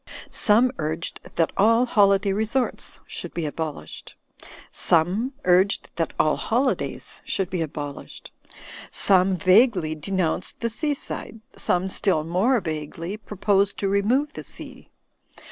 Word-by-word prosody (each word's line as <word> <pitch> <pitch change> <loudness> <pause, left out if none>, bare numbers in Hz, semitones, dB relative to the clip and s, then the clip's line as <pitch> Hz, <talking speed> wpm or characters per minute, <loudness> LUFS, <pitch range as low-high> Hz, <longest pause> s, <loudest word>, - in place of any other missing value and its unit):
Some 230 +4 +4
urged 160 +2 -3 0.2
that 165 - +1
all 230 +5 +4
holiday 200 -4 +3
resorts 220 +5 -1
should - - -6
be 170 - -2
abolished; 155 0 -6 0.6
some 190 - +2
urged 185 +3 +2
that 165 -2 -1
all 155 - +3
holidays 255 +4 -2
should 190 -2 -2
be 180 -2 -2
abolished. 145 -2 -7 0.6
Some 190 0 +4
vaguely 185 -2 +4
de 155 +3 -7
nounced 185 -2 -1
the 230 -1 -1
sea 290 +6 -1
side; 225 -4 -7 0.2
some, 180 +1 0
still 185 -4 +1
more 190 +10 +2
vaguely, 160 +3 -5
pro 210 -1 -11
posed 200 0 +2
to 200 - -1
remove 245 +10 +1
the - - -8
sea. - - -9
195 Hz, 130 wpm, -24 LUFS, 165-220 Hz, 0.6 s, Some